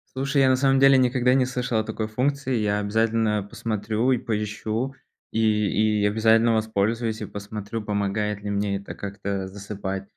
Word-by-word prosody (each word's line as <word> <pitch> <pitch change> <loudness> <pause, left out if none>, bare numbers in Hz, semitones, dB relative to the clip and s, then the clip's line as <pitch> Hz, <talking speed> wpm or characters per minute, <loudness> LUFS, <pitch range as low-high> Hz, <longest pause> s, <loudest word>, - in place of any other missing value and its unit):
Слушай, 140 +1 +1
я 130 - +5
на 130 - +5
самом 135 0 +3
деле 135 0 +6
никогда 125 0 +3
не 130 -1 +3
слышал 125 -3 -1
о - - 0
такой 110 0 -4
функции. 130 +3 -1
Я 105 -1 0
обязательно 110 0 +1
посмотрю 110 +3 -2
и 125 - +2
поищу, 110 +4 -3 0.4
и 110 - 0 0.6
и - - +2
обязательно 110 +2 +4
воспользуюсь 110 +1 0
и - - -3
посмотрю, 105 +2 -6
помогает 105 0 -2
ли 105 - -3
мне 100 0 0
это 100 - -8
как-то 100 -1 -4
засыпать. 95 0 -5
110 Hz, 165 wpm, -24 LUFS, 105-125 Hz, 0.6 s, деле